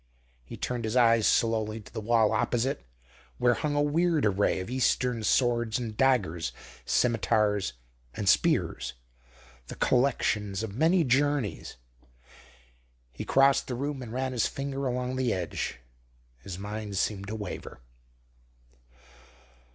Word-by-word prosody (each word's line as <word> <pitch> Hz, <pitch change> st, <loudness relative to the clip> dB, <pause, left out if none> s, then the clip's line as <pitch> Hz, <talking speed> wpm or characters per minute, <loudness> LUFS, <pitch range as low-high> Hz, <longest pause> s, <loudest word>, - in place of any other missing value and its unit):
He 60 Hz, -, -10 dB
turned 125 Hz, -1 st, -3 dB
his 110 Hz, +2 st, -2 dB
eyes 115 Hz, -3 st, +5 dB
slowly 110 Hz, -1 st, +1 dB
to 105 Hz, -, -15 dB
the -, -, -4 dB
wall 110 Hz, 0 st, +3 dB
opposite, 130 Hz, +4 st, 0 dB, 0.6 s
where 125 Hz, 0 st, +3 dB
hung 145 Hz, +3 st, -2 dB
a 145 Hz, -, +3 dB
weird 160 Hz, 0 st, +2 dB
array 100 Hz, -1 st, +2 dB
of 95 Hz, -, -5 dB
Eastern 125 Hz, -1 st, 0 dB
swords 120 Hz, +1 st, +2 dB
and 115 Hz, -4 st, -5 dB
daggers, 120 Hz, -, +1 dB, 0.3 s
scimitars 105 Hz, -, +1 dB, 0.4 s
and -, -, -4 dB
spears, -, -, +2 dB, 0.7 s
the -, -, -7 dB
collections 105 Hz, -6 st, +1 dB
of 105 Hz, -3 st, -5 dB
many 165 Hz, -, +3 dB
journeys. 135 Hz, -, 0 dB, 1.4 s
He -, -, -6 dB
crossed 135 Hz, 0 st, +4 dB
the 125 Hz, -, -3 dB
room 140 Hz, +2 st, -3 dB
and 120 Hz, -3 st, -7 dB
ran 130 Hz, +2 st, -2 dB
his 120 Hz, -4 st, +1 dB
finger 135 Hz, 0 st, -4 dB
along 125 Hz, +1 st, -2 dB
the 130 Hz, -2 st, +1 dB
edge. 90 Hz, -, -3 dB, 0.6 s
His 90 Hz, +8 st, -8 dB
mind 105 Hz, 0 st, -5 dB
seemed 100 Hz, 0 st, -1 dB
to 110 Hz, -, -4 dB
waver. 100 Hz, -, -7 dB
120 Hz, 130 wpm, -28 LUFS, 105-130 Hz, 1.4 s, eyes